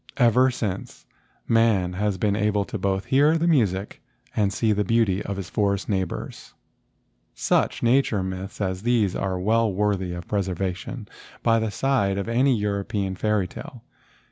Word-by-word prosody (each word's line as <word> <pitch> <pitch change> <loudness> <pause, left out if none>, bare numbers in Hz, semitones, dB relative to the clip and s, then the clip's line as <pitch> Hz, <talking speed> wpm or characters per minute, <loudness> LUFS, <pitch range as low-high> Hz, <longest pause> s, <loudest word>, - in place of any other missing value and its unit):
Ever 125 +1 +5
since, 105 -6 -5 0.4
man 110 -6 +3
has 100 +1 -1
been 100 +1 +1
able 105 -1 +1
to 110 - -5
both 95 0 -1
hear 145 +4 +4
the 165 - 0
music 105 - +1 0.3
and 100 -2 +2
see 110 +2 +1
the 105 0 +1
beauty 105 -2 +2
of 100 -1 -4
his 95 -3 -5
forest 100 -1 0
neighbors. 95 -4 -3
X - - -14 1.0
INTRODUCTION - - +3
Such - - -8
nature 115 -5 +2
myths 95 +1 -6
as 95 -1 -2
these 110 -5 +1
are 95 -1 -1
well 110 +3 +2
worthy 95 -2 0
of 85 -1 -7
preservation 95 -2 -3 0.4
by 115 -1 +4
the 110 -1 -1
side 100 -4 0
of 100 - -3
any 125 +2 +3
European 100 -1 -2
fairy¬ 105 -1 0
tale. 115 +6 -10
105 Hz, 165 wpm, -24 LUFS, 95-115 Hz, 1.0 s, Ever